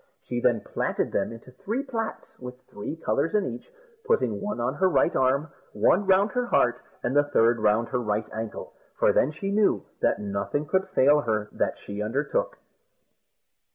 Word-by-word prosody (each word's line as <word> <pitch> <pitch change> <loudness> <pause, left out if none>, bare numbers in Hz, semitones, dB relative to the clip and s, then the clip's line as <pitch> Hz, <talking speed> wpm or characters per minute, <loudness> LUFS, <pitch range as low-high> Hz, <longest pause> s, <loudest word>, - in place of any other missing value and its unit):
She 120 - -3
then 120 -3 +2
platted - - -2
them 100 - -1
into 115 +2 -12
three 220 - -3
plats 230 -5 -5
with 125 0 -9
three 105 +9 -7
colours 165 +1 -1
in 210 - +2
each, 120 -1 -7 0.4
putting 465 - +1
one 210 -6 -3
on 120 +2 0
her 190 +4 +2
right 175 0 +2
arm, 135 +4 +2 0.2
one 195 +2 +3
round 195 +2 +4
her 245 -1 -1
heart, 125 - +2 0.2
and 125 +3 -1
the 145 0 +5
third 120 -5 +3
round 110 +2 +2
her 125 - -1
right 105 -1 -1
ankle, 110 -1 -6 0.2
for - - +3
then 130 - +3
she 195 +6 -4
knew 210 0 +2
that - - +2
nothing 100 +8 -2
could 190 +5 0
fail 145 -5 +5
with 145 - -2
her 105 -1 0
that - - -1
she 100 +1 -7
undertook. 150 - -1
135 Hz, 185 wpm, -26 LUFS, 115-190 Hz, 0.4 s, the